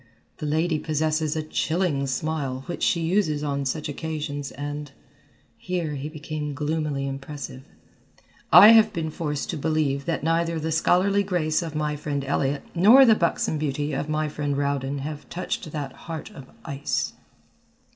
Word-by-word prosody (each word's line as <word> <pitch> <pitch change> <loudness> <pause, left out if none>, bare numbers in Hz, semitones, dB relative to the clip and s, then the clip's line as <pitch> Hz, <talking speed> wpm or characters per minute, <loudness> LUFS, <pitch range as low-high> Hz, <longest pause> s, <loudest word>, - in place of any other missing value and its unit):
The 150 - -4
lady 160 +1 +1
possesses 155 0 0
a 155 - -1
chilling 155 -2 0
smile 135 -1 -2
which 175 - -5
she 170 - +2
uses 165 -4 +1
on 140 -1 -1
such 150 +3 -2
occasions 145 -2 -4
and," 145 0 -6 0.7
here 175 -4 -2
he 145 +1 -4
became 150 -1 -5
gloomily 150 -2 -1
impressive, 135 -1 -7 0.9
"I 210 - +11
have 220 -1 +7
been 160 -2 -2
forced 150 -2 -3
to 165 - -4
believe 145 -2 0
that 165 -4 -2
neither 165 +1 +1
the 160 +1 -2
scholarly 185 +5 +3
grace 175 -5 0
of 160 -3 -5
my 150 -1 -1
friend 145 -1 -3
Elliott 140 0 0
nor 225 +10 +8
the 225 - +7
buxom 170 -4 0
beauty 145 0 -2
of 145 +2 -2
my 155 0 0
friend 145 -1 -2
Rowden 140 -1 -1
have 150 +1 -6
touched 175 -2 -4
that 145 -3 -4
heart 160 -2 -7
of 135 -2 -12 0.2
ice." 140 -3 -2
155 Hz, 155 wpm, -25 LUFS, 145-165 Hz, 0.9 s, I